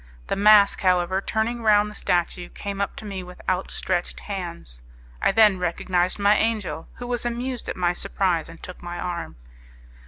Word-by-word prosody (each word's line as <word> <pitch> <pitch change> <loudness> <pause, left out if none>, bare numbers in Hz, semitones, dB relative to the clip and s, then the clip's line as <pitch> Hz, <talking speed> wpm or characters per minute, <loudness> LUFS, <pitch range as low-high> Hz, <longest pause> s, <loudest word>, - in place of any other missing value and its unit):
The - - -1
mask, 205 0 +6
however, 185 0 +2
turning 225 +3 -1
round 210 -2 +4
the 210 - -8
statue, 175 -2 -1
came 200 -1 -5
up 200 - -2
to - - -9
me 195 -2 -5
with 180 0 -11
outstretched 185 -1 -1
hands; 170 - -6 0.4
I - - +4
then 210 -4 +5
recognized 180 +1 0
my 205 +1 +4
angel, 205 -9 -1
who 245 - -7
was 245 -1 -2
amused 245 +1 -3
at - - -3
my 175 -1 +2
surprise 180 -3 0
and 165 - -13
took 180 - -9
my 175 0 -6
arm. 175 -1 -4
190 Hz, 175 wpm, -24 LUFS, 175-210 Hz, 0.4 s, mask